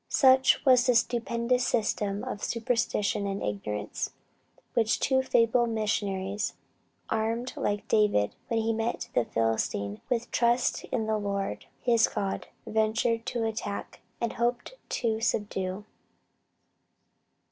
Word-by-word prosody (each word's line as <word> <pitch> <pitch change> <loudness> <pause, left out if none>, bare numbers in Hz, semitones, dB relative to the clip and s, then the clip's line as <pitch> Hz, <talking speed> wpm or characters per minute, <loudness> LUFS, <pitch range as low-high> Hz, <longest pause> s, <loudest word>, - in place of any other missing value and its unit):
Such 260 +1 +5
was 255 -1 +6
the 250 - +4
stupendous 235 +1 +1
system 210 -3 0
of 205 - -5
superstition 230 -4 0
and 195 0 -3
ignorance, 105 0 -3 0.6
which 225 -2 +2
two 265 -1 +3
feeble 240 -1 +3
missionaries 205 -2 -1 0.6
armed 225 +3 -1
like 205 0 -2
David 210 - +3
when 230 -1 +1
he 225 +1 +1
met 225 +2 -2
the 115 - +2
Philistine 110 -2 -1
with 240 -1 -1
"trust 240 +1 +2
in 230 -3 -2
the 215 0 0
Lord 200 - -3 0.2
his 235 -2 +4
God," 195 -1 -3 0.2
ventured 225 +2 +1
to 240 -3 -1
attack, 215 -2 -4 0.2
and 235 - -1
hoped 240 - -1 0.2
to 225 -2 -1
subdue. 205 -3 -1
225 Hz, 120 wpm, -28 LUFS, 200-235 Hz, 0.6 s, was